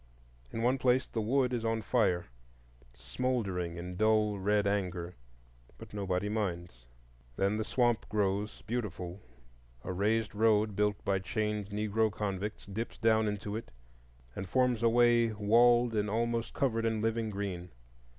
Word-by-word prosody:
In 115 - -3
one 130 +2 +2
place 125 0 +3
the 115 - -3
wood 125 +3 +1
is 120 -2 -1
on 115 -1 -1
fire, 100 -9 +1 0.7
smouldering 90 - -2
in 90 +1 -6
dull 110 -1 +2
red 105 +1 +2
anger; 90 -3 -2 0.6
but - - -12
nobody 100 -1 -1
minds. 85 - -3 0.5
Then 100 - +1
the 110 - -1
swamp 120 0 +1
grows 105 0 -1
beautiful; 100 -5 -4 0.6
a 95 - -4
raised 110 +4 0
road, 105 -1 +3
built 105 0 0
by 95 -1 +1
chained 105 0 -2
Negro 105 +1 0
convicts, 105 0 -4
dips 110 +4 -5
down 110 -1 +3
into 105 0 -3
it, 115 +1 -6 0.7
and 95 -2 -5
forms 125 -1 +2
a 115 - +4
way 120 -1 +4
walled 120 +3 +4
and 105 -1 0
almost 115 +1 -1
covered 115 -4 +1
in 110 -1 0
living 115 0 0
green. 95 -3 -4
105 Hz, 145 wpm, -31 LUFS, 100-115 Hz, 0.7 s, a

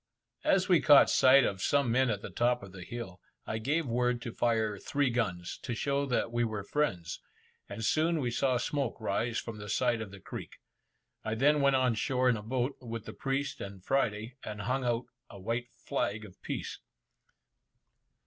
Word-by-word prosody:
As 190 -1 +3
we 180 -4 +5
caught 145 -2 +7
sight 135 0 +7
of 95 -4 -1
some 140 -1 +2
men 130 +1 +3
at 105 -2 -2
the - - -6
top 120 -1 +1
of 100 - -10
the 95 -1 -9
hill, 95 -4 -7 0.2
I 110 - -3
gave 150 +8 0
word 125 0 +1
to 115 - -4
fire 110 -3 +1
three 140 -3 0
guns, 90 -8 -2
to 120 - -3
show 140 +3 0
that 120 -2 0
we 120 0 +1
were 110 -3 -2
friends, 100 - -1 0.5
and 115 - -4
soon 160 +4 +2
we 125 -4 -1
saw 130 +1 +2
smoke 135 -1 -2
rise 110 +2 -1
from 115 -2 -5
the 105 0 -7
side 120 -1 +1
of 110 - -5
the 100 0 -11
creek. - - -8 0.7
I 110 0 -2
then 145 +5 +4
went 140 -1 +4
on 130 -2 +3
shore 125 +4 +1
in 125 - +3
a 105 - -5
boat, 125 +4 -2
with 115 -3 -6
the - - -7
priest 135 +1 -2
and 100 -2 -8
Friday, 120 -2 0
and 105 0 -5
hung 130 +6 -1
out 120 0 0 0.2
a 100 - -11
white 115 +5 -2
flag 110 -2 -3
of 95 - -15
peace. - - -4
120 Hz, 195 wpm, -31 LUFS, 110-135 Hz, 0.7 s, caught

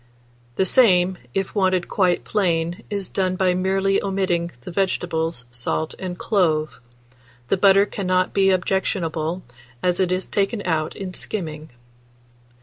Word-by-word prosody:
The 190 - +2
same, 185 -5 +4 0.2
if 195 -1 -1
wanted 185 -3 +1
quite 180 -3 +1
plain, 170 -4 0
is 200 -3 -3
done 185 -1 -1
by 185 -1 +2
merely 195 +1 +1
omitting 190 -3 0
the 150 - -8
vegetables, 170 -6 -1
salt, 120 +6 -2
and 180 -2 -5
clove; 160 -8 0 0.7
the - - +2
butter 195 +1 +5
cannot 185 -2 0
be 195 -1 +4
objectionable, 180 -3 -1 0.4
as 180 -1 +1
it 185 -1 +1
is 185 +1 0
taken 205 +1 -1
out 160 -3 -1
in 190 -2 -6
skimming. 155 -6 -4
185 Hz, 135 wpm, -22 LUFS, 170-195 Hz, 0.7 s, butter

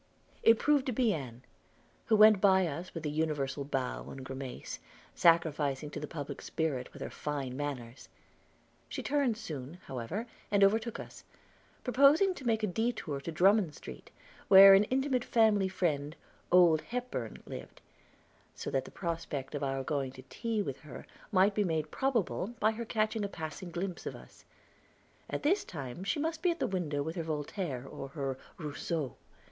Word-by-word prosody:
It 225 0 +6
proved 290 0 +2
to - - +1
be 235 -2 +2
Ann, 125 -5 -6 0.6
who 220 - +4
went 215 -2 +7
by 190 -2 +5
us 170 +3 -5
with 165 - -5
the 150 - -1
universal 145 -3 -1
bow 135 -2 -3
and 135 - -8
grimace, 130 - -6 0.3
sacrificing 150 -4 +2
to - - -5
the 150 - -5
public 145 -3 -6
spirit 140 -6 -2
with - - -8
her - - -6
fine 140 -4 -4
manners. 130 -4 -5 0.8
She - - -5
turned 275 -6 +1
soon, 155 - -6
however, 135 - -4 0.2
and 200 -1 +4
overtook 220 +3 +2
us, - - -10 0.6
proposing 280 +9 +5
to 270 - -10
make 220 -1 +1
a - - +3
detour 200 - -2
to 165 - -5
Drummond 185 -1 +3
Street, - - -10 0.4
where 195 0 +10
an 195 +2 +6
intimate 260 0 0
family 215 -5 +3
friend, 155 -5 -1 0.4
"Old 175 -3 +6
Hepburn," 240 - -5
lived, - - -9 0.8
so - - -5
that 135 -1 0
the - - -9
prospect 165 -6 -4
of 145 - -3
our 135 -1 -1
going 135 -2 -2
to 130 - -12
tea 225 -3 -1
with 135 -8 -5
her 150 -5 -10 0.3
might 195 +1 +4
be 210 - +2
made 160 -4 -1
probable 240 -4 -1
by 215 - +4
her 230 +1 -5
catching 215 -1 0
a - - 0
passing 160 +1 -6
glimpse 180 +1 -4
of - - -4
us; - - -15 0.8
at - - -3
this 365 +8 +3
time 140 +1 -7
she 290 +10 -1
must 320 +1 -2
be 360 - +3
at 340 - -1
the - - +1
window 155 -7 -1
with 160 +3 -4
her - - 0
Voltaire, 150 - -3
or 135 - -7
her 135 -2 -4 0.2
Rousseau. 150 -2 -3
170 Hz, 175 wpm, -31 LUFS, 140-220 Hz, 0.8 s, where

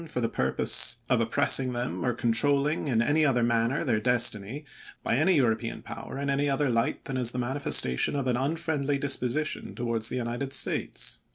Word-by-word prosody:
for 125 - -3
the 115 - 0
purpose 65 - +1 0.2
of 125 -2 +3
oppressing 130 +2 +2
them, 120 +1 -3
or 125 - +1
controlling 140 +6 +1
in 120 -4 +1
any 150 +5 +2
other 125 -5 +2
manner 115 +4 0
their 120 -8 0
destiny, 120 +2 +1 0.4
by - - 0
any 165 +7 +3
European 115 -4 -1
power - - -8
in 140 0 -3
any 140 +1 0
other 135 -1 0
light 115 0 -1
than 135 - -4
as 125 -2 +2
the 125 - -6
manifestation 125 - +2
of 140 -2 -2
an 125 -1 0
unfriendly 145 +1 -1
disposition 140 +1 -2
towards 115 -2 -2
the - - -4
United 125 +3 -4
States." - - -1
125 Hz, 180 wpm, -27 LUFS, 115-140 Hz, 0.4 s, of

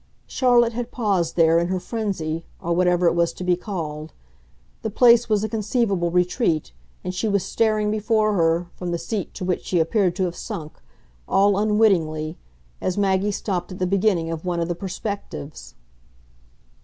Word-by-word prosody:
Charlotte 240 -2 +3
had 240 +1 -4
paused 200 -10 0
there, 165 -1 +5
in 170 - 0
her 185 0 -1
frenzy, 180 -7 -3 0.2
or 170 0 -1
what 180 +1 +2
ever 180 0 +2
it 170 - +4
was 170 -1 +2
to 185 - -7
be 180 0 +2
called; 160 -5 -6 0.7
the 220 - -2
place 235 +2 +5
was 210 -1 +2
a - - 0
conceivable 210 -4 0
retreat, 180 - +1 0.3
and 180 - -3
she 185 +5 -1
was 200 -3 +1
staring 215 0 +1
before 215 0 +1
her, 165 -1 +2
from 180 - -5
the 170 - -1
seat 200 +2 -4
to 185 - -4
which 180 -1 -1
she 180 - -1
appeared 180 +1 +1
to 190 - 0
have 175 -1 -2
sunk, 155 -2 -7 0.5
all 200 +1 +3
unwittingly, 190 -7 +2 0.5
as 185 - -1
Maggie 195 0 +2
stopped 190 -3 -3
at - - -8
the 185 - 0
beginning 185 -3 +1
of 160 -1 -5
one 175 -2 -1
of 170 - -1
the 175 - -1
perspectives. 190 -4 -6
185 Hz, 180 wpm, -23 LUFS, 170-215 Hz, 0.7 s, there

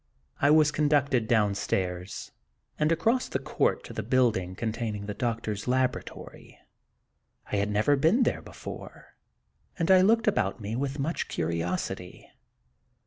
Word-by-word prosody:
I 140 - +5
was 150 0 +5
conducted 145 -6 +2
downstairs, 100 -4 -1 0.5
and 155 +1 +2
across 230 +10 +1
the - - -1
court - - 0
to - - -9
the - - -3
building 110 -8 +1
containing 110 -1 -3
the 105 - -4
doctor 115 0 -2
s 105 +2 -5
laboratory, 130 0 -3 0.9
I - - +1
had 100 +1 0
never 105 +8 +3
been 165 - +3
there - - 0
before, - - -10 0.6
and 170 0 +1
I 185 -1 +7
looked 220 +4 +3
about 105 - +1
me 105 +1 -4
with 135 +2 -2
much 150 +4 -2
curiosity. 90 +2 -3
120 Hz, 140 wpm, -28 LUFS, 100-150 Hz, 0.9 s, I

